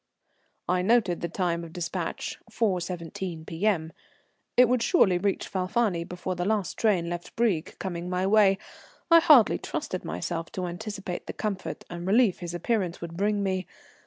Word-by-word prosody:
I 180 0 +2
noted 195 -3 +2
the 170 - -2
time 170 -1 -1
of 165 -1 -10
despatch, 175 -1 -4
4.17 180 -4 -2
P.M. 165 -2 0 0.6
It 250 0 +8
would 250 0 +2
surely 190 - +4
reach 200 +1 -1
Falfani 185 -1 0
before 180 +1 -4
the 175 0 -2
last 205 -1 0
train 195 -7 +2
left 175 0 -6
Brieg 205 -9 0
coming 175 -2 -4
my 180 +1 0
way, 200 -1 +5
and - - -7 0.5
I 335 - +10
hardly 285 -9 +6
trusted - - -4
myself 125 - -4
to 185 -4 -3
anticipate 195 0 -5
the - - -4
comfort 200 -3 -4
and 175 +1 -6
relief 215 -1 +4
his 175 -1 -5
appearance 180 -1 -1
would 170 -1 -7
bring 205 +2 +1
me. 190 -1 -1
185 Hz, 160 wpm, -27 LUFS, 175-210 Hz, 0.6 s, I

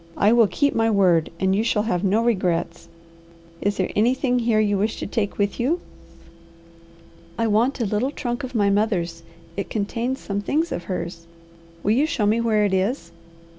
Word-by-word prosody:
"I 210 +3 +4
will 235 -2 +5
keep 285 +7 +1
my 225 0 +2
word 180 -6 +3
and 190 0 +2
you 215 - +1
shall 210 -2 +1
have 185 -5 -1
no 205 +4 +2
regrets. 180 -6 -1 0.7
Is 205 0 0
there 185 - -1
anything 250 +3 +2
here 230 -2 +2
you 205 -1 +2
wish 215 +2 -1
to - - -4
take 205 0 -2
with 205 +2 -1
you?" 290 +9 +1 1.6
"I 230 - +1
want 230 +6 +1
a 235 - 0
little 215 +6 0
trunk 245 -2 -4
of 255 -1 -6
my 200 -2 +3
mother's. 185 -5 0 0.3
It 200 - -4
contains 230 +5 -2
some 200 0 -3
things 315 +10 -1
of 175 - -4
hers." 170 -2 -5 0.6
"Will 205 - +2
you 275 +7 +3
show 250 -10 -1
me 220 +3 +2
where 215 -2 +2
it 200 - 0
is?" 190 -2 -1
210 Hz, 185 wpm, -23 LUFS, 195-235 Hz, 1.6 s, will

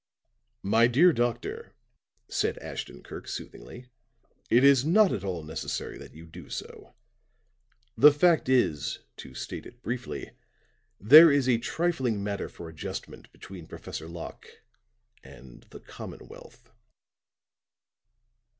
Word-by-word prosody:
"My 115 +4 +4
dear 160 +9 +5
doctor," 120 -3 -3 0.5
said - - -1
Ashton - - -8
Kirk - - -10
soothingly, 125 +1 -9 0.6
"it 120 +3 +4
is 140 -2 +6
not 190 +6 +4
at 100 - -3
all 90 -5 -4
necessary 80 +1 -5
that - - -13
you 80 +1 -12
do 85 -1 -13
so. - - -9 1.0
The 150 +2 +8
fact 160 -1 +2
is, 120 - +1 0.2
to 65 - -11
state - - -7
it 120 0 -18
briefly, 125 +2 -5 0.7
there 155 - +9
is 140 -2 +2
a 120 -3 +3
trifling 130 -9 -1
matter 100 -1 -4
for 85 - -10
adjustment 80 -1 -8
between 90 -4 -12
Professor 80 - -8
Locke 85 0 -9 0.8
and 65 -1 -15
the - - -11
commonwealth." - - -12
120 Hz, 120 wpm, -27 LUFS, 85-140 Hz, 1.0 s, there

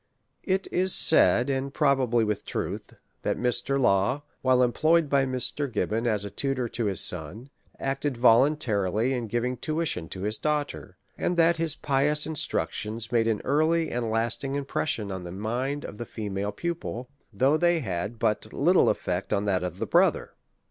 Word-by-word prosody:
It 190 0 -1
is 185 +1 +4
said, 125 -5 +6
and 135 +1 -2
pixibably 130 -6 +2
with 105 -1 -2
truth, - - -5 0.3
that - - -1
Mr. 125 +3 -1
Law, 120 +5 +2 0.2
while 130 -1 +3
employed 155 +5 +2
by 135 -1 +3
Mr. 130 +2 -2
Gibbon 110 +2 -1
as 105 -3 0
tutor 135 -3 0
to 115 - -3
his 100 -3 +1
son, 90 - -2 0.3
acted 135 -1 -2
voluntarily 115 -3 +2
in 120 -3 -3
giving 120 +3 -2
tuition 155 - -2
to 95 - -7
his 105 +2 -1
daughter; 145 -10 -3 0.2
and 175 - -1
that 165 0 +4
his 160 -2 -2
pious 150 +2 +1
instructions 115 -7 -3
made 115 -2 +2
an 110 -2 0
early 160 +3 +1
and 120 -1 -2
lasting* 115 +5 -1
impression 135 -6 -2
on 95 -1 -5
the 90 - -7
mind 120 +9 -3
of 105 - -9
his 120 - -5
female 100 -2 -4
pupil, 155 - -5 0.2
though 130 +8 +2
they 175 0 +2
had 100 +1 -4
but 110 -2 -1
little - - +3
eifect - - -2
on 100 - 0
that 95 -3 0
of 90 -2 -4
her - - -2
brother. - - +2
125 Hz, 165 wpm, -26 LUFS, 110-145 Hz, 0.3 s, said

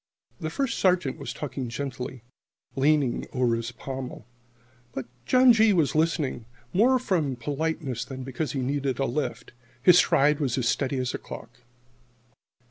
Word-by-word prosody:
The 155 -3 -3
First 260 - -2
Sergeant 180 -7 +2
was - - -5
talking 135 -4 -5
gently, 130 -1 -5 0.5
leaning 140 -2 +2
over 125 -2 +2
his 115 +1 -4
pommel. 130 0 -7 0.7
But 130 - -4 0.2
John 255 -1 +7
G. 220 -1 +5
was 160 -5 +2
listening 155 -7 0 0.3
more 245 +7 +5
from 175 - 0
politeness 145 +1 -2
than 130 -2 -7
because 135 +2 -3
he 135 - -1
needed 135 0 -1
a 135 - +1
lift. 145 +4 -3 0.3
His 180 -1 +7
stride 145 +1 +4
was 135 -5 0
as 125 -3 0
steady 135 +1 0
as 130 -1 -1
a - - -3
clock. 120 +1 -10
140 Hz, 150 wpm, -26 LUFS, 130-160 Hz, 0.7 s, John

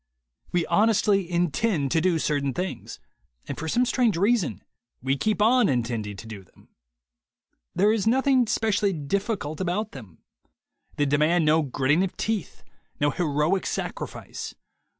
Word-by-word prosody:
We 175 -1 +1
honestly 205 -1 +2
intend 170 - 0
to 160 - +2
do 180 -1 +2
certain 140 -4 -1
things, 185 +1 -5 0.5
and - - -4
for 160 - -5
some 245 +10 +2
strange 235 -6 +1
reason 195 - +1 0.4
we 135 +2 0
keep 210 +8 0
on 240 0 +4
intending 115 -5 -2
to 95 - -9
do 105 -3 -9
them. 90 - -24 1.1
There 205 +3 +4
is 220 -2 -1
nothing 260 0 +3
specially 210 -3 +1
difficult 165 +1 -3
about 195 +4 -1
them. 105 - -12 0.7
They 145 - +1
demand 155 +4 +2
no 155 +1 +4
gritting 145 +4 +1
of 190 - -4
teeth, 220 -5 -3 0.4
no 145 0 +2
heroic 160 +3 0
sacrifice. - - -5
175 Hz, 140 wpm, -25 LUFS, 145-210 Hz, 1.1 s, on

